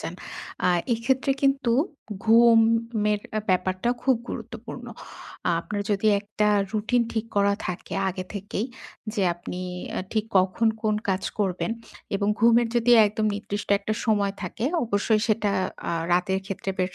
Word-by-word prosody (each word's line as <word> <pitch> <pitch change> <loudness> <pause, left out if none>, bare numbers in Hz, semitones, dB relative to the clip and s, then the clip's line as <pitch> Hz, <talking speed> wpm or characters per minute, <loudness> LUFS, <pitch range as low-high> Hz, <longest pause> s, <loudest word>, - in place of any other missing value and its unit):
যান। 165 - -5 0.5
আর 175 -1 +3 0.2
এক্ষেত্রে 260 +4 +1
কিন্তু 275 -3 +2 0.5
ঘুমের 225 -2 +4 0.3
ব্যাপারটা 185 +3 0
খুব 260 -1 +3
গুরুত্বপূর্ণ। - - -7 0.7
আপনার 205 -1 -4
যদি 205 +1 +1
একটা 210 0 0 0.2
routine 225 +3 +1
ঠিক 225 0 -2
করা 200 0 +4
থাকে 180 +1 -5
আগে 185 0 -4
থেকেই 200 +3 -3 0.5
যে, 205 - 0
আপনি 175 +1 -7 0.4
এ - - 0
ঠিক 215 -1 +1
কখন 190 +5 +2
কোন 215 -1 +2
কাজ 190 0 +1 0.2
করবেন 195 +1 0 0.5
এবং 200 +1 0
ঘুমের 235 0 +5
যদি 240 +1 +2 0.2
একদম 215 +1 -1
নির্দিষ্ট 205 0 -5
একটা 215 +1 -3
সময় 205 -2 +2
থাকে, 215 +6 -4 0.2
অবশ্যই 215 0 +1
সেটা 215 -1 +2 0.4
আ - - -1 0.2
রাতের 180 +2 +2
ক্ষেত্রে 195 0 -4
বেশ 185 0 -1
210 Hz, 140 wpm, -25 LUFS, 195-230 Hz, 0.7 s, ঘুমের